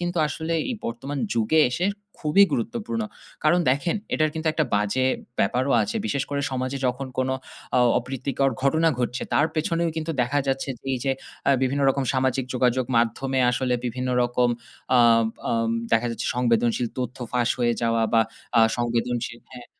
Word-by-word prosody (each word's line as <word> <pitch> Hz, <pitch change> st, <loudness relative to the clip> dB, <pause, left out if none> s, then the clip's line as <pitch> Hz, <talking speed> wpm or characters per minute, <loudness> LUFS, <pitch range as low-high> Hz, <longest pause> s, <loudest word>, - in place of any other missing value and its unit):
কিন্তু 175 Hz, -1 st, -2 dB
আসলে 160 Hz, +2 st, -3 dB, 0.2 s
এ -, -, 0 dB
বর্তমান 135 Hz, +5 st, -4 dB, 0.2 s
যুগে 115 Hz, +8 st, +3 dB
এসে 175 Hz, +9 st, 0 dB, 0.4 s
খুবই 175 Hz, +7 st, +6 dB
গুরুত্বপূর্ণ। 230 Hz, -, -2 dB, 0.4 s
কারণ 175 Hz, +3 st, +4 dB
দেখেন, 145 Hz, +9 st, 0 dB, 0.2 s
এটার 155 Hz, -1 st, +2 dB
কিন্তু 160 Hz, 0 st, -4 dB
একটা 155 Hz, 0 st, +1 dB
বাজে 105 Hz, +6 st, +1 dB, 0.3 s
ব্যাপারও 125 Hz, +7 st, +1 dB
আছে। 225 Hz, +2 st, -3 dB
বিশেষ 140 Hz, -10 st, 0 dB
করে 140 Hz, -, -1 dB
সমাজে 130 Hz, +1 st, -2 dB
যখন 130 Hz, +2 st, -2 dB
কোন 130 Hz, -, +1 dB, 0.5 s
অ -, -, +5 dB, 0.2 s
অপ্রীতিকর 135 Hz, +2 st, -1 dB
ঘটনা 160 Hz, +4 st, +3 dB
ঘটছে, 125 Hz, 0 st, -2 dB
তার 150 Hz, -, +4 dB
পেছনেও 170 Hz, +1 st, 0 dB
কিন্তু 160 Hz, +1 st, -2 dB
দেখা 140 Hz, +4 st, 0 dB
যাচ্ছে 135 Hz, +1 st, -1 dB
যে -, -, -39 dB
এই 130 Hz, -, 0 dB
যে 135 Hz, -, +2 dB, 0.4 s
আ -, -, +6 dB
বিভিন্ন 140 Hz, +2 st, +1 dB
রকম 135 Hz, 0 st, -1 dB
সামাজিক 130 Hz, 0 st, +1 dB
যোগাযোগ 125 Hz, 0 st, +2 dB
মাধ্যমে 130 Hz, +3 st, +1 dB
আসলে 125 Hz, 0 st, 0 dB
বিভিন্ন 125 Hz, +2 st, -3 dB
রকম 120 Hz, 0 st, +2 dB, 0.5 s
আ -, -, +6 dB, 0.4 s
বাম 115 Hz, 0 st, 0 dB, 0.2 s
দেখা 115 Hz, +1 st, +3 dB
যাচ্ছে 115 Hz, 0 st, -4 dB
সংবেদনশীল 120 Hz, 0 st, +2 dB
তথ্য 125 Hz, -1 st, -3 dB, 0.2 s
ফাঁস 125 Hz, -1 st, +1 dB
হয়ে 120 Hz, -1 st, +2 dB
যাওয়া 115 Hz, 0 st, +2 dB
বা, 115 Hz, -, +5 dB, 0.4 s
আ -, -, +7 dB, 0.2 s
সংবেদনশীল 120 Hz, 0 st, -1 dB
হ্যাঁ, 125 Hz, -1 st, -10 dB
130 Hz, 165 wpm, -24 LUFS, 120-145 Hz, 0.5 s, আ